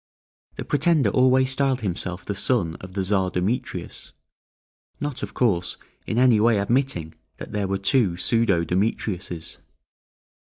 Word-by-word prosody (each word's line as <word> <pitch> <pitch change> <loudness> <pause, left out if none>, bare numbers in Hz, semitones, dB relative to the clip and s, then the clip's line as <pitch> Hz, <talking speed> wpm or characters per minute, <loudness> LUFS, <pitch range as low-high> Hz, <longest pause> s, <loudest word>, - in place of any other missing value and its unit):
The - - -6
pretender 145 -6 +2
always 130 +2 +3
styled 130 -1 0
himself 90 -2 -4
the 100 - -2
son 100 -4 0
of 95 0 -11
the 95 - 0
Czar 95 -1 +1
Demetrius; 95 +8 -4 0.9
not, 145 -3 -3
of - - -6
course, 100 -9 0 0.3
in 110 - -2
any 125 -3 +5
way 115 0 +4
admitting 100 - 0 0.2
that - - -9
there 105 -2 -1
were 95 +1 -1
two 100 -2 +2
pseudo 100 -4 +2
Demetriuses. 90 -2 -2
105 Hz, 140 wpm, -24 LUFS, 95-130 Hz, 0.9 s, any